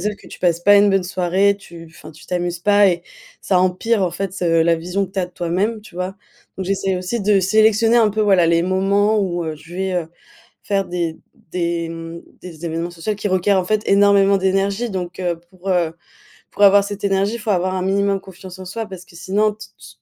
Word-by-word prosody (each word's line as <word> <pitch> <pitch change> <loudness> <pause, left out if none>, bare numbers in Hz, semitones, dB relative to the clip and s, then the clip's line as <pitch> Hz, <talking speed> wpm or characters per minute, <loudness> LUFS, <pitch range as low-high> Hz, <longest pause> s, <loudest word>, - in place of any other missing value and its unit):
sauf 210 +3 -2
que - - -18
tu - - -11
passes 175 -2 +1
pas 205 +3 +6
une 200 0 +5
bonne 195 -1 +2
soirée, 185 +2 +1
tu 170 -4 -12
enfin 155 -1 -13
tu 155 - -16
t'amuses 175 -1 -2
pas 205 +1 +4
et 175 -2 -1 0.4
ça 185 - +1
empire 190 +4 +1
en 180 - +1
fait 190 +2 -4
ce, 165 -3 +1
la 170 0 +3
vision 180 +4 -2
que 190 - -19
tu 195 - -4
as 180 - 0
de 180 - -19
toi-même, 190 +6 -1
tu 200 -4 -16
vois? 185 +1 -3 0.4
Donc 190 - -4
j'essaie 195 -1 0
aussi 185 +6 -3
de 200 -1 +3
sélectionner 220 +4 +3
un 220 -3 +4
peu, 215 - -2
voilà, 190 -4 +4
les 170 0 +3
moments 200 +3 +2
où 175 -3 -2
heu, 155 -1 -4
je 165 +3 -14
vais, 190 0 -2
heu, 170 -3 -2 0.5
faire 195 -1 0
des 170 -2 -3 0.3
des 170 -1 -1
mmh 165 0 -8 0.2
des 170 -2 -8
événements 165 +2 -3
social 175 +5 -4
qui 205 0 -3
requièrent 185 +1 +2
en - - -4
fait 215 +3 +1
énormément 200 0 +5
d'énergie. 195 +4 0
Donc, 180 -2 -5
heu, 175 -2 -2
pour, 185 +1 -6
heu 175 -3 +1 0.6
pour 205 - 0
avoir 200 0 +7
cette 205 0 -7
énergie, 200 +3 +1
il - - -6
faut 215 0 -2
avoir 185 0 0
un 185 - -2
minimum 195 +1 +1
confiance 190 0 -12
en 185 - -8
soi 220 +5 -5
parce 185 -2 -10
que 170 - -19
sinon 210 +4 0
t 215 - -12
tu - - -14
190 Hz, 230 wpm, -19 LUFS, 175-200 Hz, 0.6 s, avoir